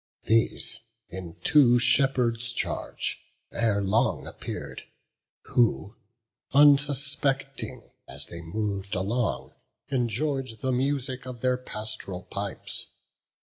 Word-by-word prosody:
These, 115 Hz, +1 st, +2 dB, 0.3 s
in 85 Hz, -1 st, -6 dB
two 130 Hz, -5 st, +6 dB
shepherds' 125 Hz, -2 st, +2 dB
charge, -, -, -2 dB, 0.3 s
ere 110 Hz, -3 st, +1 dB
long 100 Hz, +4 st, +2 dB
appear'd, -, -, -6 dB, 0.6 s
Who, 110 Hz, -3 st, +1 dB, 0.6 s
unsuspecting 140 Hz, -1 st, +2 dB, 0.2 s
as -, -, -5 dB
they 85 Hz, -1 st, -5 dB
mov'd 100 Hz, +3 st, -2 dB
along, 110 Hz, +6 st, 0 dB, 0.4 s
Enjoy'd 130 Hz, 0 st, -1 dB
the 130 Hz, -1 st, +1 dB
music 130 Hz, 0 st, -1 dB
of 125 Hz, -2 st, -7 dB
their 125 Hz, 0 st, +3 dB
past'ral 110 Hz, -6 st, -5 dB
pipes. -, -, -4 dB
120 Hz, 95 wpm, -27 LUFS, 105-135 Hz, 0.6 s, two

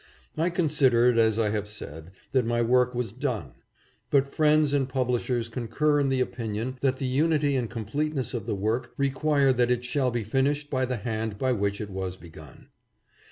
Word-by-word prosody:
I 165 Hz, +3 st, +1 dB
con 175 Hz, -1 st, 0 dB
sidered, 125 Hz, -5 st, +4 dB
as 110 Hz, -1 st, +3 dB
I 110 Hz, -2 st, +1 dB
have 105 Hz, -1 st, -2 dB
said, 80 Hz, -6 st, -7 dB, 0.2 s
that 130 Hz, -2 st, +2 dB
my 120 Hz, +1 st, 0 dB
work 125 Hz, +1 st, +2 dB
was 120 Hz, -4 st, -2 dB
done. 125 Hz, -3 st, -3 dB, 0.6 s
But 140 Hz, -1 st, +3 dB
friends 150 Hz, 0 st, +3 dB
and 135 Hz, -2 st, +1 dB
publishers 125 Hz, -2 st, -1 dB
concur 145 Hz, +6 st, 0 dB
in 140 Hz, -1 st, +1 dB
the 130 Hz, -1 st, +1 dB
opinion 120 Hz, +1 st, -3 dB
that 135 Hz, -1 st, +1 dB
the 135 Hz, -, -3 dB
unity 145 Hz, +2 st, +2 dB
and 120 Hz, -4 st, -1 dB
completeness 130 Hz, +4 st, -3 dB
of 115 Hz, -3 st, -4 dB
the 110 Hz, -, -1 dB
work 110 Hz, +5 st, -2 dB
require 140 Hz, 0 st, +2 dB
that 125 Hz, -1 st, +2 dB
it 125 Hz, 0 st, 0 dB
shall 130 Hz, +1 st, +1 dB
be 120 Hz, -2 st, -2 dB
finished 140 Hz, +6 st, 0 dB
by 130 Hz, -2 st, +1 dB
the 125 Hz, -1 st, -2 dB
hand 110 Hz, -2 st, -3 dB
by 130 Hz, +3 st, 0 dB
which 100 Hz, -3 st, -1 dB
it 105 Hz, -2 st, -6 dB
was 95 Hz, -1 st, -4 dB
begun. 80 Hz, -6 st, -14 dB
125 Hz, 190 wpm, -26 LUFS, 110-140 Hz, 0.6 s, sidered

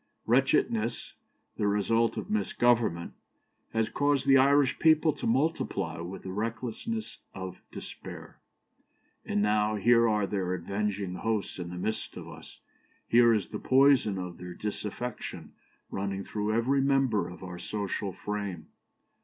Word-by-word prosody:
Wretchedness, 115 Hz, +1 st, +1 dB, 0.4 s
the 105 Hz, -, +1 dB
result 115 Hz, +3 st, +2 dB
of -, -, -4 dB
misgovernment, 120 Hz, -, +1 dB, 0.6 s
has 115 Hz, -1 st, +1 dB
caused 145 Hz, -1 st, +1 dB
the 135 Hz, -1 st, +6 dB
Irish 140 Hz, 0 st, +4 dB
people 155 Hz, -1 st, +5 dB
to 150 Hz, -, -4 dB
multiply 140 Hz, -, 0 dB
with 90 Hz, +3 st, -7 dB
the 95 Hz, -, -5 dB
recklessness 115 Hz, -, -4 dB, 0.2 s
of 95 Hz, -1 st, -7 dB
despair, -, -, -9 dB, 0.9 s
and 105 Hz, -, 0 dB
now 105 Hz, 0 st, +2 dB
here 115 Hz, +2 st, +4 dB
are 105 Hz, -2 st, +2 dB
their 95 Hz, -2 st, -1 dB
avenging 100 Hz, +1 st, -2 dB
hosts 110 Hz, 0 st, -2 dB
in 85 Hz, -1 st, -5 dB
the 90 Hz, -, -7 dB
midst 110 Hz, +5 st, -3 dB
of -, -, -8 dB
us, -, -, -12 dB, 0.5 s
here 120 Hz, 0 st, +6 dB
is 105 Hz, -5 st, +1 dB
the -, -, -5 dB
poison 130 Hz, -6 st, +4 dB
of 90 Hz, -2 st, -6 dB
their 90 Hz, 0 st, -7 dB
disaffection 105 Hz, +3 st, -5 dB, 0.4 s
running 100 Hz, 0 st, -3 dB
through 105 Hz, +1 st, -2 dB
every 125 Hz, +5 st, +2 dB
member 135 Hz, -9 st, +2 dB
of 90 Hz, -, -11 dB
our 90 Hz, -1 st, -7 dB
social 100 Hz, -1 st, -3 dB
frame. 100 Hz, -3 st, -4 dB
105 Hz, 135 wpm, -29 LUFS, 95-125 Hz, 0.9 s, the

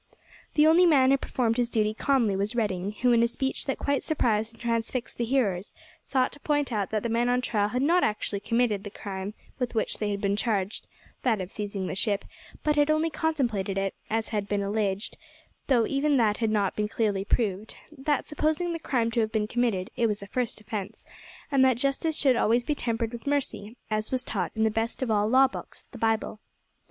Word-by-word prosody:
The 300 Hz, -, +6 dB
only 340 Hz, +3 st, +6 dB
man 270 Hz, -5 st, +5 dB
who 275 Hz, -, +5 dB
performed 235 Hz, -4 st, -1 dB
his 240 Hz, -1 st, +1 dB
duty 215 Hz, -3 st, +1 dB
calmly 235 Hz, -4 st, +2 dB
was 200 Hz, +4 st, -1 dB
Redding, 200 Hz, -3 st, -1 dB
who, 250 Hz, -, +5 dB
in 235 Hz, -1 st, +5 dB
a 235 Hz, -, +4 dB
speech 265 Hz, +3 st, -1 dB
that 270 Hz, -, -1 dB
quite 280 Hz, -1 st, 0 dB
surprised 225 Hz, -7 st, 0 dB
and 230 Hz, -, -20 dB
transfixed 230 Hz, +1 st, -2 dB
the 235 Hz, -, +1 dB
hearers, 215 Hz, -7 st, 0 dB, 0.3 s
sought 260 Hz, -2 st, +1 dB
to 285 Hz, -, -12 dB
point 290 Hz, -2 st, 0 dB
out 205 Hz, -4 st, -1 dB
that 215 Hz, -1 st, -1 dB
the -, -, 0 dB
men 235 Hz, +2 st, +1 dB
on 245 Hz, 0 st, +3 dB
trial 210 Hz, -5 st, 0 dB
had 250 Hz, +4 st, -1 dB
not 345 Hz, +5 st, +4 dB
actually 210 Hz, -1 st, -1 dB
committed 220 Hz, -1 st, +1 dB
the 205 Hz, -, -6 dB
crime, 200 Hz, 0 st, -6 dB, 0.2 s
with 250 Hz, -2 st, -2 dB
which 220 Hz, -, 0 dB
they 210 Hz, -, -1 dB
had 200 Hz, -1 st, -2 dB
been 200 Hz, 0 st, +1 dB
charged, 205 Hz, -2 st, -1 dB, 0.3 s
that 225 Hz, -5 st, +1 dB
of 185 Hz, +1 st, -5 dB
seizing 200 Hz, -2 st, -4 dB
the -, -, -3 dB
ship, 200 Hz, +1 st, 0 dB, 0.4 s
but 300 Hz, -1 st, +1 dB
had 290 Hz, 0 st, +4 dB
only 310 Hz, +1 st, +2 dB
contemplated 235 Hz, -, -1 dB
it, 195 Hz, 0 st, 0 dB, 0.2 s
as 225 Hz, 0 st, -1 dB
had 205 Hz, -2 st, -2 dB
been 205 Hz, -1 st, 0 dB
alleged, 200 Hz, -1 st, -1 dB, 0.5 s
though 245 Hz, -5 st, +4 dB
even 280 Hz, +2 st, +1 dB
that 215 Hz, -4 st, +3 dB
had 225 Hz, -2 st, 0 dB
not 205 Hz, -3 st, +1 dB
been 210 Hz, 0 st, 0 dB
clearly 210 Hz, -3 st, 0 dB
proved; 210 Hz, -1 st, -1 dB, 0.2 s
that, 285 Hz, 0 st, 0 dB
supposing 315 Hz, +3 st, 0 dB
the 330 Hz, -, -4 dB
crime 235 Hz, -7 st, 0 dB
to 235 Hz, -, 0 dB
have 220 Hz, -1 st, +1 dB
been 220 Hz, -2 st, +1 dB
committed, 220 Hz, -6 st, 0 dB
it 235 Hz, -, +2 dB
was 210 Hz, -2 st, -2 dB
a -, -, -9 dB
first 245 Hz, +1 st, -2 dB
offence, 210 Hz, -2 st, -6 dB, 0.5 s
and 270 Hz, -2 st, +4 dB
that 260 Hz, -3 st, +4 dB
justice 275 Hz, +4 st, 0 dB
should 265 Hz, -3 st, +4 dB
always 235 Hz, +1 st, +2 dB
be 300 Hz, -, 0 dB
tempered 230 Hz, -4 st, -2 dB
with 235 Hz, +4 st, -8 dB
mercy, 255 Hz, -6 st, -2 dB
as 215 Hz, 0 st, -1 dB
was 260 Hz, -1 st, 0 dB
taught -, -, -2 dB
in 220 Hz, -, +1 dB
that 220 Hz, -1 st, +2 dB
best 225 Hz, +3 st, -2 dB
of 240 Hz, -, -1 dB
all 210 Hz, -1 st, +2 dB
law 265 Hz, +2 st, +6 dB
books, 260 Hz, -, -9 dB
the -, -, -10 dB
Bible. 225 Hz, -1 st, 0 dB
230 Hz, 220 wpm, -27 LUFS, 210-265 Hz, 0.5 s, The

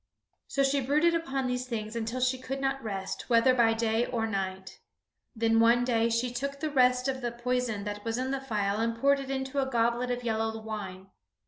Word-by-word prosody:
So 275 Hz, -, +1 dB
she 275 Hz, +1 st, +2 dB
brooded 300 Hz, +6 st, +3 dB
upon 275 Hz, -5 st, -1 dB
these 250 Hz, 0 st, -2 dB
things 220 Hz, -2 st, -4 dB
until 230 Hz, +2 st, -3 dB
she 255 Hz, +1 st, +1 dB
could 265 Hz, +1 st, -4 dB
not 270 Hz, 0 st, -1 dB
rest, 195 Hz, -1 st, -5 dB
whether 235 Hz, +2 st, +5 dB
by 230 Hz, -2 st, +3 dB
day 225 Hz, +1 st, +1 dB
or 230 Hz, -3 st, -1 dB
night. 190 Hz, -2 st, -4 dB, 0.6 s
Then 225 Hz, 0 st, +2 dB
one 235 Hz, +2 st, +5 dB
day 230 Hz, -2 st, +2 dB
she 235 Hz, +2 st, 0 dB
took 280 Hz, +3 st, -3 dB
the 310 Hz, 0 st, -2 dB
rest 250 Hz, -1 st, +3 dB
of 265 Hz, -1 st, -2 dB
the 240 Hz, -1 st, -2 dB
poison 240 Hz, -3 st, -2 dB
that 205 Hz, 0 st, -5 dB
was 225 Hz, 0 st, -2 dB
in 260 Hz, +1 st, -2 dB
the 275 Hz, -1 st, -2 dB
phial 210 Hz, -5 st, -1 dB
and 230 Hz, 0 st, 0 dB
poured 280 Hz, +2 st, +4 dB
it 270 Hz, -1 st, -6 dB
into 265 Hz, +1 st, -2 dB
a 265 Hz, -, -2 dB
goblet 240 Hz, 0 st, +1 dB
of 245 Hz, 0 st, -2 dB
yellow 225 Hz, -1 st, -1 dB
wine. 195 Hz, -3 st, -7 dB
240 Hz, 210 wpm, -29 LUFS, 225-265 Hz, 0.6 s, whether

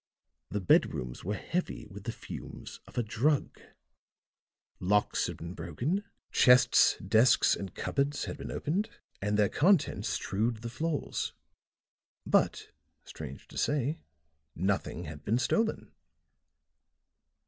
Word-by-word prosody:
The 105 Hz, -, -2 dB
bedrooms 60 Hz, -8 st, +2 dB
were 105 Hz, +4 st, -1 dB
heavy 175 Hz, -, -3 dB
with 100 Hz, 0 st, -11 dB
the 120 Hz, -, -1 dB
fumes -, -, -9 dB
of -, -, -15 dB
a 120 Hz, -, +2 dB
drug; 130 Hz, +7 st, 0 dB, 1.2 s
locks 105 Hz, +3 st, +2 dB
had -, -, -6 dB
been 85 Hz, +2 st, -7 dB
broken, 125 Hz, -, -2 dB, 0.3 s
chests, 125 Hz, -1 st, +6 dB
desks 110 Hz, +6 st, +4 dB
and 95 Hz, -1 st, -7 dB
cupboards 140 Hz, +1 st, -1 dB
had -, -, -5 dB
been -, -, -7 dB
opened, 190 Hz, +8 st, -1 dB, 0.3 s
and 105 Hz, +1 st, 0 dB
their 105 Hz, -1 st, +4 dB
contents 180 Hz, -, +2 dB
strewed 110 Hz, +3 st, -1 dB
the 115 Hz, -, -3 dB
floors. 155 Hz, +5 st, -2 dB, 0.9 s
But, -, -, +1 dB, 0.3 s
strange 65 Hz, -, -9 dB
to -, -, -5 dB
say, 145 Hz, +2 st, 0 dB, 0.6 s
nothing 95 Hz, -2 st, -1 dB
had 75 Hz, -2 st, -8 dB
been 110 Hz, +7 st, +1 dB
stolen. 220 Hz, -, 0 dB
115 Hz, 120 wpm, -30 LUFS, 95-145 Hz, 1.2 s, chests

